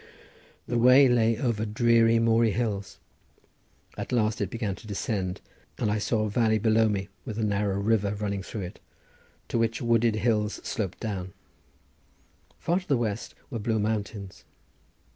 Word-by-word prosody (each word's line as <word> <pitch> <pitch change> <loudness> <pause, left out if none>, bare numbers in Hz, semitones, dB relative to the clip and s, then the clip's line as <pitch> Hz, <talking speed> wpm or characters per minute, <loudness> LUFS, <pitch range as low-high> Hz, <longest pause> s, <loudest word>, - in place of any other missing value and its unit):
The 120 0 -1
way 130 +3 +7
lay 115 -2 +3
over 115 -3 -1
dreary, 115 +1 +3
moory 115 -1 +3
hills: 105 -4 -2 1.0
at - - -6
last 110 -3 +1
it - - -1
began 110 -4 -2
to 110 - -13
descend 100 -2 -3 0.4
and 105 - 0
I 105 - 0
saw 110 +1 0
a 105 - -1
valley 110 0 +2
below 110 +1 +3
me 100 -1 -2
with 110 -5 -6
a 115 - -1
narrow 100 -1 0
river 105 -1 +1
running 100 -1 -2
through 105 +2 -6
it 90 0 -7 0.7
to 115 - 0
which 115 0 0
wooded 115 -2 +2
hills 110 -2 0
sloped 100 -4 -3
down; 95 -5 -4 1.2
far 175 +2 0
to 185 - -15
the 140 - +2
west 110 -2 -3 0.2
were 115 - -3
blue 110 +1 0
mountains. 105 -2 -3
110 Hz, 160 wpm, -27 LUFS, 105-115 Hz, 1.2 s, way